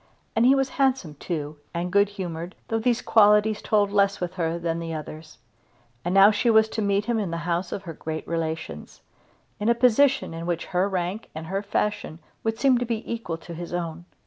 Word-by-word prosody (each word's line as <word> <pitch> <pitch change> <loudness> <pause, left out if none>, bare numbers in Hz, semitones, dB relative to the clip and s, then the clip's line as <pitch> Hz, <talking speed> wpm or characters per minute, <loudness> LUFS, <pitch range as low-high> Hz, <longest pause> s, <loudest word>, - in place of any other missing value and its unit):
And 230 +2 +4
he 270 - +6
was 270 -1 +1
handsome 260 - +1
too, 150 0 -5 0.2
and 175 +1 -2
good 200 0 +4
humoured, 175 -3 -6
though 225 - 0
these 240 +1 +1
qualities 210 0 +4
told 205 -2 +2
less 200 -1 +2
with 180 0 -3
her 170 -2 -1
than 170 -1 -2
the 165 -1 -4
others. 155 -1 -8 0.7
And 175 - -1
now 195 +2 +8
she 225 +3 +1
was 220 -1 +5
to 220 - -3
meet 200 0 +1
him 235 -2 0
in 200 -4 -2
the 165 - -3
house 175 +1 -1
of 195 - -4
her 170 -3 -7
great 160 +1 -6
relations, 160 -1 -4 0.6
in 210 +2 +1
a 235 - +4
position 250 -2 +3
in 165 +1 -6
which 175 -2 -1
her 185 +3 +2
rank 185 +3 -3
and 160 +1 -6
her 195 +4 -2
fashion 205 -4 -2 0.3
would 225 0 -1
seem 260 -2 +4
to 245 - -1
be 230 -1 -3
equal 200 -8 -4
to 170 +1 -10
his 175 +1 -7
own. 170 -1 -4
195 Hz, 210 wpm, -25 LUFS, 170-220 Hz, 0.7 s, now